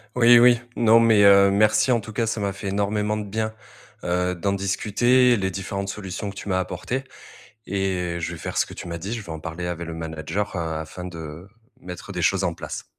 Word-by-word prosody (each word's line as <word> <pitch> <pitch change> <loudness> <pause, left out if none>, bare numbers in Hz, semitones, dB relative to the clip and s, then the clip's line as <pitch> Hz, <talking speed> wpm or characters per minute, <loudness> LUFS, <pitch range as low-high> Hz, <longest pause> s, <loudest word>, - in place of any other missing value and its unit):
Oui, 120 -1 +7
oui, 120 -1 +6 0.2
non, 115 0 +5
mais, 115 -3 +5
heu, 100 0 +7
merci 110 +5 +3
en 120 - +3
tout 110 +1 -9
cas, 115 +2 0
ça 110 0 -2
m'a 100 -1 0
fait 100 0 -6
énormément 105 +1 0
de 105 - -3
bien, 110 +1 -2 0.5
heu, 90 +1 0
d'en 100 +3 -1
discuter, 120 +5 +2
les 95 -1 -1
différentes 100 +1 -4
solutions 100 0 -5
que - - -15
tu 100 - -7
m'as 95 - +1
apportées 95 +9 -3 0.6
et 95 -3 -1
je - - -3
vais - - -7
faire - - -5
ce - - +3
que - - -11
tu - - -8
m'as 85 0 -4
dit. 95 +6 -6
Je 115 - -4
vais 85 - -9
en 80 - -7
parler 85 +2 -5
avec 85 -1 -4
le 85 - -6
manager, 80 +5 -4
heu, - - -2
afin 80 +2 -5
de 85 0 -8 0.3
mettre 90 -1 -8
des - - -3
choses - - +2
en - - -1
place. - - -7
100 Hz, 225 wpm, -23 LUFS, 90-110 Hz, 0.6 s, Oui